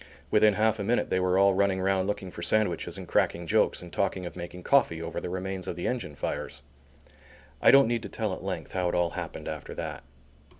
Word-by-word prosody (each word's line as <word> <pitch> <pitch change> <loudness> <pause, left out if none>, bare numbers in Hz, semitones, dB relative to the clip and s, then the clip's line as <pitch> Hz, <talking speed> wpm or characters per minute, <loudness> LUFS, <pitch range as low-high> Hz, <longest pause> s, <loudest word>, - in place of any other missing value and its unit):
Within 105 -1 +5
half 110 0 +2
a - - -1
minute 120 +4 0
they 95 - +2
were 90 0 +2
all 100 0 +5
running 95 0 +2
round 95 0 +1
looking 95 -3 -3
for 85 - -8
sandwiches 90 -3 0
and - - -8
cracking 85 0 +1
jokes 85 - +2
and 90 - -11
talking 95 -2 -1
of 85 - -7
making 90 0 -8
coffee 130 -12 +3
over 85 - -4
the - - -4
remains 95 0 -4
of 90 - -3
the 85 - -5
engine 120 - -2
fires. 70 - -4 1.0
I - - +6
don't 135 -3 +7
need 120 -1 0
to - - -7
tell 110 -4 -2
at - - -6
length 95 -1 -4
how 90 -2 0
it - - -2
all 85 -2 +1
happened - - -6
after - - -6
that. - - -5
95 Hz, 225 wpm, -28 LUFS, 90-105 Hz, 1.0 s, don't